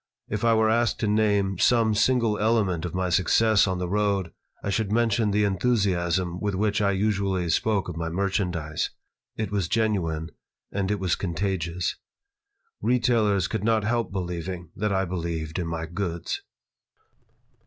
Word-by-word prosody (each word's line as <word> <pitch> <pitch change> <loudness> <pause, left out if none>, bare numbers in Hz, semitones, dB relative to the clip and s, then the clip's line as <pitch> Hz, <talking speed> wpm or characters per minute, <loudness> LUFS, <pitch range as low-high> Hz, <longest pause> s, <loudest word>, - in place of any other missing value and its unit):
If 105 +1 -3
I 115 -1 +4
were 110 0 +3
asked 120 +1 +1
to 110 - +1
name 105 -3 +2
some 115 -3 +4
single 115 -1 +2
element 105 -6 +1
of 90 - -5
my 90 0 0
success 100 +4 +4
on 95 -1 -1
the 90 0 -2
road 100 -2 0 0.3
I 100 - -1
should 100 0 -1
mention 115 -1 +2
the 105 +1 +2
enthusiasm 95 -4 +1
with 100 -1 -1
which 105 +2 +1
I 100 - +3
usually 100 -2 0
spoke 105 +3 +1
of 90 - -5
my 85 0 -3
merchandise. 90 -4 -1 0.5
It 110 -3 -2
was 100 -5 0
genuine, 85 -8 0 0.4
and 95 -1 -1
it 105 -1 0
was 90 -3 0
contagious. 90 -1 -2 0.8
Retailers 115 -6 +2
could - - -3
not 110 -1 +2
help 115 +1 0
believing 90 -2 -4
that 105 +1 -1
I 95 0 +1
believed 85 -2 -3
in 85 - -2
my 80 0 -3
goods. 85 0 -3
100 Hz, 155 wpm, -25 LUFS, 90-110 Hz, 0.8 s, I